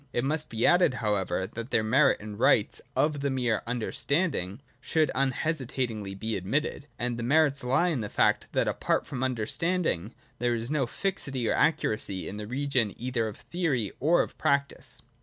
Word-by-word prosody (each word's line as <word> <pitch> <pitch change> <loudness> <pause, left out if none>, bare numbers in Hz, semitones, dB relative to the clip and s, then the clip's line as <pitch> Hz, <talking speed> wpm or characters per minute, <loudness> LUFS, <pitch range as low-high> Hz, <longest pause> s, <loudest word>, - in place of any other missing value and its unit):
It 120 - 0
must 150 +3 -1
be 115 0 0
added 175 -7 +5
however, 105 -5 0
that 115 +4 -7
the 110 - +2
merit 135 +7 +4
and 105 -1 -8
rights - - +3
of 150 -1 +2
the 140 0 0
mere 125 -5 0
Understanding 125 - -1 0.2
should 160 -2 +1
unhestitatingly 130 -7 -1
be 110 +3 -3
admitted. 140 +9 -2
And 120 -1 -2
that - - -4
merit 140 +2 +3
lies 155 +8 +2
in 130 - -1
the 105 - -4
fact, - - +2
that - - +2
apart - - 0
from 135 -4 -5
Understanding 130 - -1 0.2
there 120 -1 +1
is 115 +3 -4
no 145 -5 +1
fixity 135 - -2
or - - +2
accuracy 110 - +1
in 100 - -6
the 105 0 -6
region 125 -4 0
either 120 -2 -1
of 105 - -7
theory 145 - -1
or 160 +6 +4
of - - -9
practice. 140 -2 0
125 Hz, 175 wpm, -28 LUFS, 110-145 Hz, 0.2 s, added